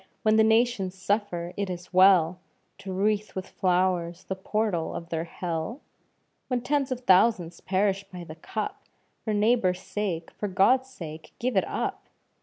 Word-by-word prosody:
when 215 0 +4
the 220 - +6
nations 220 -4 +2
suffer, 185 -3 -1
is 180 -3 -3
it - - -27
well 185 -2 +5 0.4
To 200 -1 -7
wreath 205 +2 0
with 190 -1 -4
flowers 180 -2 0
the 190 - -4
portal 190 -3 -1
of 170 - -6
their 165 0 -2
hell? 170 - -4 0.7
When 250 -2 0
tens 275 +1 0
of 250 -1 -2
thousands 185 -5 +3
perish 195 +1 +1
by 180 -2 -9
the 155 - -9
cup. 205 +6 -5 0.4
For 220 - -2
neighbour's 210 -3 +2
sake, 185 -7 -3
for 210 - -4
God's 250 +8 +3
sake, 160 -9 -9
give 250 -1 -1
it 190 - +2
up! - - -3
190 Hz, 160 wpm, -27 LUFS, 175-215 Hz, 0.7 s, the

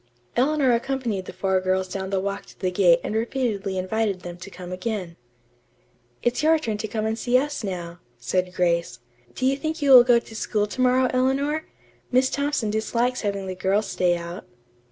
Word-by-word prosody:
Eleanor 270 +1 +3
accompanied 235 -5 -1
the - - -7
four 185 0 0
girls 185 0 0
down 190 0 -4
the 195 -1 0
walk 200 +1 -4
to - - -17
the 185 -1 -1
gate 180 -2 +5
and - - -3
repeatedly 220 -4 -1
invited 195 0 -1
them 175 -1 -7
to 180 +2 -10
come 180 -1 -9
again. 185 -2 -4 1.1
"It's 240 +4 +1
your 320 +1 +5
turn 220 -9 -3
to 220 - -3
come 215 0 -2
and 220 +1 -1
see 250 0 +3
us 290 -1 -2
now," 175 -3 -5 0.2
said 180 +10 -1
Grace. 170 -6 +1 0.4
"Do 255 - -2
you 270 +1 +3
think 315 +3 -3
you 285 -2 +2
will 250 -2 +11
go 240 -1 +5
to 230 -1 -6
school 210 -1 0
to 210 +5 -4
morrow, 255 0 +4
Eleanor? 275 +5 +1 0.5
Miss 260 +1 +3
Thompson 280 -6 0
dislikes 235 +3 0
having 200 -2 -2
the 185 - -4
girls 190 +3 +1
stay 175 -1 +1
out." 170 +1 -8
215 Hz, 195 wpm, -24 LUFS, 185-255 Hz, 1.1 s, will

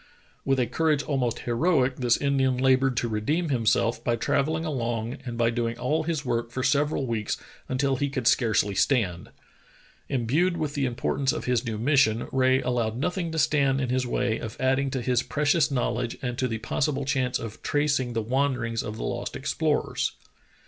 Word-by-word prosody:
With 135 -1 +1
a 125 - +3
courage 150 +4 +1
almost 130 -5 -1
heroic, 130 +1 +1
this 120 -2 +2
Indian 135 -2 +1
labored 130 -1 +3
to 120 - +1
redeem 145 +11 -1
himself 115 -2 +1
by 120 - +1
travelling 155 +7 0
along 120 -5 -2
and 120 -1 -4
by 115 0 +2
doing 115 0 -2
all 150 +7 0
his 155 -3 -2
work 120 -1 -1
for 130 +2 -4
several 145 0 +1
weeks 115 -3 -2 0.3
until 135 +1 +1
he 140 +2 0
could 130 -3 -3
scarcely 110 -4 +3
stand. 95 -7 +1 0.8
Imbued 150 +9 +1
with 150 -2 -2
the 140 -3 0
importance 130 +2 0
of - - -4
his 125 -2 +1
new 110 -2 -3
mission, 120 -2 +2
Rae 130 0 +3
allowed 120 -3 -1
nothing 170 +4 -2
to - - -3
stand 140 -3 +2
in 130 -2 -1
his 125 0 0
way 120 -2 0
of 115 0 -7
adding 135 +1 +1
to 130 -2 -3
his 125 -1 +2
precious 145 +4 +1
knowledge 125 -3 -1
and 125 -1 -2
to 130 - +1
the 115 -2 -3
possible 135 +5 -1
chance 130 -2 0
of 115 -1 -8
trac 145 -1 +1
ing 125 -2 -3
the 115 -1 -1
wanderings 125 -2 0
of 105 +1 -6
the - - -5
lost - - -3
explorers. - - -1
130 Hz, 185 wpm, -26 LUFS, 115-140 Hz, 0.8 s, a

